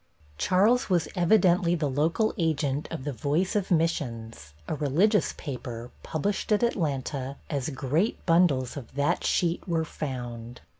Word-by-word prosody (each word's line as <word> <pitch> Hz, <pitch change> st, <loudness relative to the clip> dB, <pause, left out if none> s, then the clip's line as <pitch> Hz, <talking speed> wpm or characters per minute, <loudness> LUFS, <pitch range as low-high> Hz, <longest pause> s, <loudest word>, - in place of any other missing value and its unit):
Charles 210 Hz, +8 st, +3 dB
was 175 Hz, -3 st, +2 dB
evidently 175 Hz, -2 st, +4 dB
the 155 Hz, -3 st, 0 dB
local 160 Hz, +10 st, +1 dB
agent 155 Hz, -, 0 dB
of 165 Hz, -6 st, -5 dB
the 145 Hz, 0 st, -3 dB
Voice 150 Hz, -, 0 dB
of 205 Hz, -3 st, 0 dB
Missions, 115 Hz, -, -1 dB
a -, -, -2 dB
"religious" 160 Hz, +9 st, +2 dB
paper, 125 Hz, -4 st, -7 dB
published 195 Hz, +7 st, -2 dB
at 210 Hz, +2 st, +3 dB
Atlanta, 140 Hz, -, -1 dB
as 140 Hz, -1 st, -1 dB
great 150 Hz, -, -1 dB
bundles 165 Hz, -8 st, +3 dB
of 130 Hz, -3 st, -9 dB
that 145 Hz, +5 st, +1 dB
sheet 175 Hz, +2 st, 0 dB
were 165 Hz, -2 st, 0 dB
found. 120 Hz, -5 st, -6 dB
155 Hz, 140 wpm, -27 LUFS, 130-180 Hz, -, evidently